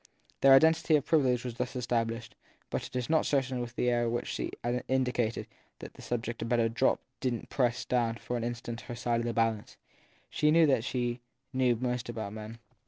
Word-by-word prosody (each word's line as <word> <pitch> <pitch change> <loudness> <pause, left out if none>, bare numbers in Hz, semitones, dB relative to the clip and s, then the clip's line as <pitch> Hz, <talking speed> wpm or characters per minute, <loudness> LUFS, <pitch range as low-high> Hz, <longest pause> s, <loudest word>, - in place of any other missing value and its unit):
Their 135 0 +8
identity 160 +2 +5
of 145 - +1
privilege 130 -6 +2
was 125 - -3
thus 125 +1 -3
established, 115 -1 -2 0.4
but - - -2
it - - -15
is 125 -2 -1
not 160 -1 +3
certain 135 -3 0
that 120 0 -6
the 125 - +1
air 120 -1 +1
with 120 +1 -1
which - - -11
she - - -2 0.4
indicated 125 -3 0 0.3
that - - -10
the - - -13
subject 120 -1 -3
had 115 - -3
better 120 -1 +3
drop 115 +4 +1 0.2
didn 125 -4 -1
t - - -13
press 120 -3 +1
down 120 -2 +1
for 125 - -5
an 120 - -2
instant 120 0 -4
her 120 - -7
side 120 0 0
of 120 - -2
the 120 - -1
balance. 115 -2 -1 0.5
She 150 - +2
knew 165 +1 +6
that 135 -6 +2
she 120 -1 -2 0.3
knew 130 -2 +3
most 125 0 -2
about 110 -3 -4
men. 110 +1 -8
120 Hz, 210 wpm, -30 LUFS, 115-130 Hz, 0.5 s, Their